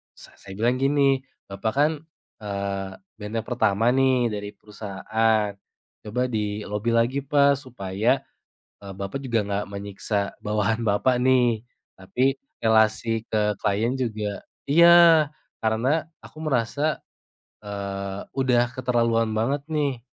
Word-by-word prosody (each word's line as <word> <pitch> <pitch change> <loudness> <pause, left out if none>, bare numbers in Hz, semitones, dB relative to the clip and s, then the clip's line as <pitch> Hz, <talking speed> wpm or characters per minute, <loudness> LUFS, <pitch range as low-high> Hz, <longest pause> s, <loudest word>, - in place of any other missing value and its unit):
S - - -14
saya 95 -1 -10
bilang 120 +4 +1
gini, 135 -1 +3 0.3
"Bapak 100 +3 -2
kan, 150 +3 +4 0.5
eee, 100 -2 -3 0.3
benteng 110 +1 -4
yang - - -27
pertama 110 -1 +2
nih 130 -2 +3
dari 105 -1 -4
perusahaan, 105 +1 -1 0.5
coba 110 +4 -3
di 105 -1 -2
lobi 105 +3 -2
lagi, 120 +4 +2
Pak 140 0 +4
supaya, 115 0 -1 0.6
eee, 100 -1 -8
Bapak 100 +7 -4
juga 115 -3 +1
enggak 100 0 -2
menyiksa 100 +1 -3 0.2
bawahan 105 +2 0
Bapak 110 +5 +2
nih, 125 -3 +3 0.3
tapi 130 +8 0 0.2
relasi 110 0 +2
ke 105 -1 +1
klien 110 +6 0
juga" 110 -5 -3 0.3
iya, 170 +4 +7 0.8
karena 110 +4 +1 0.3
aku - - -14
merasa, 145 +2 0 0.7
eee, 100 -1 -5 0.2
udah 125 -2 +3
keterlaluan 115 -3 +1
banget 135 +6 0
nih. 140 -6 -1
110 Hz, 120 wpm, -24 LUFS, 105-130 Hz, 0.8 s, iya